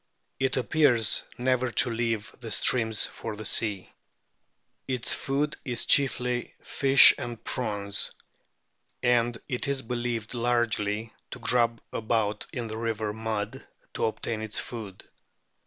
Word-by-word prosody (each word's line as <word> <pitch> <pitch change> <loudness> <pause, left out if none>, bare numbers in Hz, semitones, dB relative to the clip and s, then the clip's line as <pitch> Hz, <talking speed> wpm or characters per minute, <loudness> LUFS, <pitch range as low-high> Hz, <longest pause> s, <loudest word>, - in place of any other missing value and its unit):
It 135 0 0
appears 125 -3 +3
never 130 0 +1
to 125 - +4
leave 115 0 -2
the 120 -2 -7
streams 110 0 +3
for 115 -2 -7
the 110 +1 -8
sea. 100 -2 -1 0.9
Its 130 -3 -1
food 145 +2 -1
is 125 -4 0
chiefly 125 -3 +2
fish 135 0 +7
and 120 -2 -6
prawns, 105 -5 -1 0.9
and 120 -1 +2
it 125 -2 -2
is 140 -1 -1
believed 120 -2 -3
largely 115 -3 0 0.2
to - - -7
grub 115 -1 +1
about 110 -2 -1
in 120 - -4
the 110 0 -5
river 110 -2 -2
mud 110 -1 -4 0.3
to - - -1
obtain 110 0 -3
its 110 -1 -4
food. 105 -6 -6
115 Hz, 125 wpm, -27 LUFS, 110-125 Hz, 0.9 s, fish